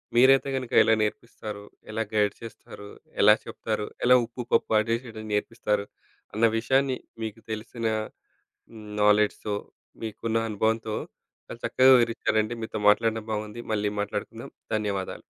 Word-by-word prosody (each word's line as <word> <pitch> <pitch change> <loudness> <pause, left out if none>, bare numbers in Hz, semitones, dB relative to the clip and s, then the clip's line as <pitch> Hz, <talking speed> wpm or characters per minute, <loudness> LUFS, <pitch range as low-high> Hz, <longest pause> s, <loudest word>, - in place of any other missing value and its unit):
మీరైతే 135 +3 +6
కనుక 130 -2 -4
ఎలా 110 - +4
నేర్పిస్తారు, 105 -1 -5 0.3
ఎలా 110 +1 -1
గైడ్ 105 -1 +2
చేస్తారు, 105 -2 -10 0.3
ఎలా - - +8
చెప్తారు, 110 -1 -3 0.2
ఎలా 125 +1 +7
ఉప్పు, 120 +2 -8
పప్పు 115 - +2
అడ్జస్ట్ 115 +3 -1
చేయడం 110 -1 -8
నేర్పిస్తారు, 105 -1 -1 0.5
అన్న 115 +2 +3
విషయాన్ని 130 +3 +1 0.3
మీకు 110 0 -6
తెలిసిన 115 +2 -5 1.2
నాలెడ్జ్‌తో, 105 0 +3 0.5
మీకున్న 115 +1 -2
అనుభవంతో 110 +1 0 0.5
చాలా 115 - -9
చక్కగా 130 +3 +5
వివరించారండి. 115 -1 +1
మీతో 110 - -4
మాట్లాడడం 110 +1 +3
బాగుంది. 105 +2 -4
మళ్ళీ 105 -1 0
మాట్లాడుకుందాం. 105 0 -5 0.3
ధన్యవాదాలు 100 -3 -3
110 Hz, 120 wpm, -26 LUFS, 105-115 Hz, 1.2 s, ఎలా